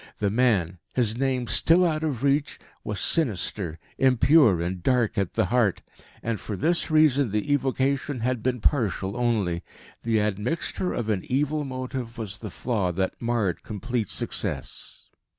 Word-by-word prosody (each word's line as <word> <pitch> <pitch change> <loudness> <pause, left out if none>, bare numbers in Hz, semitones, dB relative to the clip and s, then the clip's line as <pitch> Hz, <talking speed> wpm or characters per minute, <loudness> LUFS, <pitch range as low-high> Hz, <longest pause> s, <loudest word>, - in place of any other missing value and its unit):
The 100 -1 0
man, 100 -7 +1 0.2
his 115 -4 +2
name 130 -1 0
still 170 +8 +4
out 155 -2 0
of 140 -6 -2
reach, 140 +1 +1 0.3
was 105 -3 -3
sinister, 100 - +1 0.2
impure 130 - +5
and 90 +1 -3
dark 125 0 +1
at 100 -3 -1
the 110 - +2
heart. 115 -7 +2 0.4
And 115 -2 -2
for 105 - -5
this 170 - +1
reason 150 -5 +4
the 105 +7 0
evocation 135 -1 0
had 125 0 -1
been 125 0 -1
partial 105 - 0
only. 110 -8 0 0.4
The 115 -2 +1
admixture 105 - -1
of 115 -2 -3
an 100 -4 0
evil 145 +3 0
motive 130 -2 -5
was 105 -2 -5
the 110 - -6
flaw 100 -3 -1
that 95 +2 -2
marred 115 -7 0
complete 115 0 -3
success. - - -3
120 Hz, 150 wpm, -25 LUFS, 105-135 Hz, 0.4 s, impure